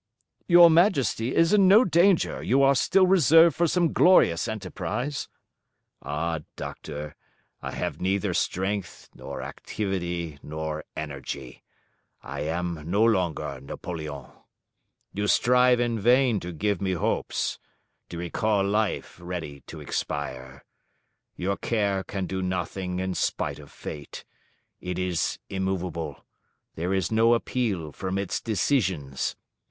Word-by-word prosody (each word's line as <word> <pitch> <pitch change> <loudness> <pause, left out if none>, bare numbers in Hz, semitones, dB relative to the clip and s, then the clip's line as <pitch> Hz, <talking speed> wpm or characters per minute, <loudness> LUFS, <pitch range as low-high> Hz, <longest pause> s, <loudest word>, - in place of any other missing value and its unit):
"Your 175 -1 +8
Majesty 150 - +2
is 165 +3 +4
in 200 -2 +6
no 215 +6 +7
danger: 175 +1 +3
you 135 +2 +3
are 135 0 +6
still 185 +7 +4
reserved 165 -2 +6
for 170 - +2
some 170 0 +1
glorious 145 - +5
enterprise." 110 - -4 0.7
"Ah, 80 +3 -2 0.2
Doctor! 75 0 -7 0.5
I - - -5
have - - -4
neither 95 +1 0
strength 95 0 -2
nor - - -7
activity 85 -6 -4
nor 80 0 -5
energy; 70 -3 -6 0.6
I - - -6
am 85 0 -3
no 100 +4 +3
longer 85 - 0
Napoleon. 75 -1 -6 0.9
You 105 +1 -1
strive 125 +2 +4
in 120 -2 0
vain 120 0 +4
to 90 - -6
give 100 +3 -1
me 95 -1 0
hopes, 85 - -1 0.5
to 85 - -7
recall 100 +4 0
life 105 -2 -1
ready 85 -5 -6
to - - -9
expire. 65 -1 -5 0.7
Your 100 +2 -2
care 100 -4 0
can 95 -1 -4
do 95 +1 -3
nothing 90 0 -3
in 95 0 -2
spite - - -2
of 70 -1 -13
fate: 75 -1 -8 0.5
it 90 -1 -4
is 90 -2 -1
immovable: 90 -6 -3 0.5
there 85 +3 -3
is 95 -1 0
no 115 +2 +4
appeal 105 -10 -2
from 95 +6 -4
its 100 -2 -2
decisions. 95 - 0
95 Hz, 125 wpm, -26 LUFS, 80-120 Hz, 0.9 s, Your